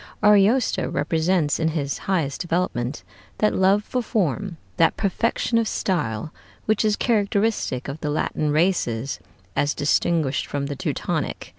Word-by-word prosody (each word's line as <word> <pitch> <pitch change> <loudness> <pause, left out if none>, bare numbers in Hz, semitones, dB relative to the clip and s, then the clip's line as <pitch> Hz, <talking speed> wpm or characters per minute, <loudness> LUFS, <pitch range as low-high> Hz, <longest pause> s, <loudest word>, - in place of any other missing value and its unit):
Ariosto 210 +4 +4
represents 160 -2 +1
in 160 0 +2
its 140 -3 -2
highest 160 -8 0
development 165 -8 -2 0.3
that 215 - +2
love 195 +2 +3
for 250 +3 -2
form, 195 - -1 0.2
that 165 -2 +3
perfection 230 +3 +1
of 225 - 0
style, 150 - -2 0.3
which 215 0 +2
is 215 -1 +2
characteristic 205 - 0
of 140 +3 -5
the 150 - -2
Latin 150 0 -1
races 145 -7 0 0.4
as 145 0 +1
distinguished 150 -1 +1
from 140 -1 -2
the 140 0 -4
Teutonic. - - -3
170 Hz, 135 wpm, -23 LUFS, 145-205 Hz, 0.4 s, Ariosto